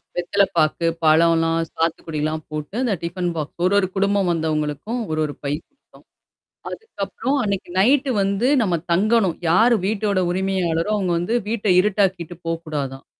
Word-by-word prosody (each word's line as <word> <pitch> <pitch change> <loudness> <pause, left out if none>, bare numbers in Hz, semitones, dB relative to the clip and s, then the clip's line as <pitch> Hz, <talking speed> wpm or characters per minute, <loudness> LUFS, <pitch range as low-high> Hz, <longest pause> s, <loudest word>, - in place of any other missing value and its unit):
வெத்தல 180 +3 +1
பாக்கு, 155 +2 +2 0.2
பழம்லாம், 165 +1 +4
சாத்துக்குடிலாம் 155 -1 -2
போட்டு, 155 +4 -6
அ - - 0
இந்த 235 -5 +1
டிஃபன் 175 +1 -2
பாக்ஸ். 150 -2 -5
ஒரு, 190 - +2
ஒரு 190 - 0
குடும்பம் 200 -1 +1
வந்தவங்களுக்கும், 160 - -2
ஒரு, 155 - -1
ஒரு 145 - -5
பை 140 +1 -1
குடுத்தோம். 285 - -24 0.7
அதுக்கப்புறம் 255 - -3
அன்னைக்கு 200 -3 -2
நைட்டு 265 +6 +3
வந்து 200 +6 +1
நம்ம 180 -5 +1 0.2
தங்கணும். 205 -2 +2
யாரு 225 +7 +5
வீட்டோட 205 -2 0
உரிமையாளரோ 185 -1 0
அவங்க 190 -3 -1
வந்து 200 +8 -1
வீட்ட 220 -2 -2
இருட்டாக்கிட்டு 185 -4 0
போக்கூடாதாம். 150 -5 -4
180 Hz, 140 wpm, -21 LUFS, 160-205 Hz, 0.7 s, யாரு